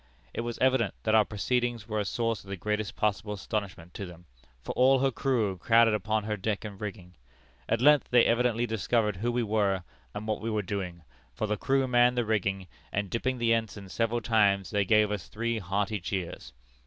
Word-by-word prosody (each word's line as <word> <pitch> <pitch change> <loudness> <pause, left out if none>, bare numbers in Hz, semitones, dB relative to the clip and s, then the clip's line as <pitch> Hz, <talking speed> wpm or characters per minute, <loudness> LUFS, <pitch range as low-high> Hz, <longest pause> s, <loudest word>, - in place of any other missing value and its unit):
It - - -2
was 120 0 -4
evident 130 -5 +2
that 110 - +1
our 110 -1 +6
proceedings 120 +1 -1
were 110 -1 -1
a 105 - -1
source 115 0 -1
of 95 - -15
the 100 - -4
greatest 105 +2 -2
possible 105 0 -1
astonishment 100 -4 -5
to 100 - -6
them, 90 0 -13 0.3
for - - -6
all 130 +2 +4
her 135 +1 +2
crew 115 -6 0
crowded 115 +2 +5
upon 110 +1 0
her 105 0 -2
deck 105 +2 -3
and 100 -2 -8
rigging. 95 -4 -7 0.6
At 115 - +1
length 150 +1 +5
they 120 -1 +5
evidently 120 0 +2
discovered 110 -2 0
who 120 +5 -1
we 120 0 0
were, 100 -4 +1 0.3
and 105 - -5
what 110 -1 -1
we 115 - -2
were 105 -2 -1
doing, 90 -3 -4 0.3
for - - -1
the 105 0 0
crew 135 +5 +1
manned 125 0 +4
the 120 - +1
rigging, 100 -3 -1 0.3
and 100 -1 -2
dipping 130 +2 -1
the 115 -1 +2
ensign 110 -4 -3
several 115 +3 0
times 100 -4 +2
they 100 -2 +1
gave 105 +1 +4
us 100 -4 -4
three 115 +1 -2
hearty 100 +2 -1
cheers. 90 - -5
110 Hz, 205 wpm, -28 LUFS, 100-115 Hz, 0.6 s, our